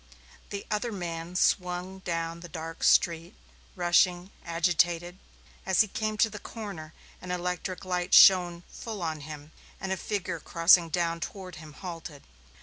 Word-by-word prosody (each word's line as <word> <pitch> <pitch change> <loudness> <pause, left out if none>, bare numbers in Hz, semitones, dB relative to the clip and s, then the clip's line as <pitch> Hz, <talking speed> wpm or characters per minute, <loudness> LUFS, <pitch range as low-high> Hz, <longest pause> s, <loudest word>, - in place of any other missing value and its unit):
The 200 0 -5
other 215 +3 -1
man 170 -3 -5
swung 180 +1 0
down 165 -2 -3
the 175 0 -10
dark 165 +1 -7
street, 170 +2 +3 0.4
rushing, 175 +1 +2
agitated. 175 +1 +1 0.4
As 190 +2 +3
he 215 - +2
came 215 +1 -3
to 220 - +4
the 210 - -7
corner 195 -9 -8 0.3
an 180 - -9
electric 180 +1 -3
light 180 0 -2
shone 175 -2 +7
full 215 -5 -6
on 160 -2 -2
him 150 0 -9 0.3
and 190 0 -4
a 190 - 0
figure 185 -5 -3
crossing 170 +1 +4
down 170 0 -1
toward 185 +1 -7
him 155 -1 -11
halted. 165 -4 -8
175 Hz, 145 wpm, -28 LUFS, 165-190 Hz, 0.4 s, shone